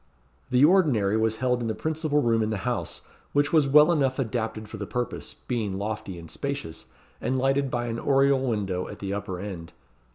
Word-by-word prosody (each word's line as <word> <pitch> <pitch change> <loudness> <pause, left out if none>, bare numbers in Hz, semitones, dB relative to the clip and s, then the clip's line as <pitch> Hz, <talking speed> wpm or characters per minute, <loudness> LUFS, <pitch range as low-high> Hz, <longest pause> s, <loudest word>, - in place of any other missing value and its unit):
The 130 +2 +5
ordinary 145 - +3
was 110 0 +1
held 125 0 0
in 115 - -2
the 110 - -1
principal 155 -2 0
room 115 -1 +2
in 110 - 0
the 110 0 -3
house; 125 -3 -2 0.3
which 145 +2 +2
was 155 -4 +5
well 150 +4 +7
enough 135 -5 +1
adapted 110 -3 -2
for 110 - -8
the 100 -2 -5
purpose, 125 0 -4
being 110 -6 -1
lofty 105 -2 -4
and 85 -1 -9
spacious, 140 - -5 0.3
and 130 +3 0
lighted 135 +1 +1
by 120 -1 -1
an 115 -1 -3
oriel 135 0 +3
window 100 -8 -1
at - - -8
the 100 0 -4
upper 100 -3 -4
end. 90 -4 -7
120 Hz, 195 wpm, -26 LUFS, 105-140 Hz, 0.3 s, well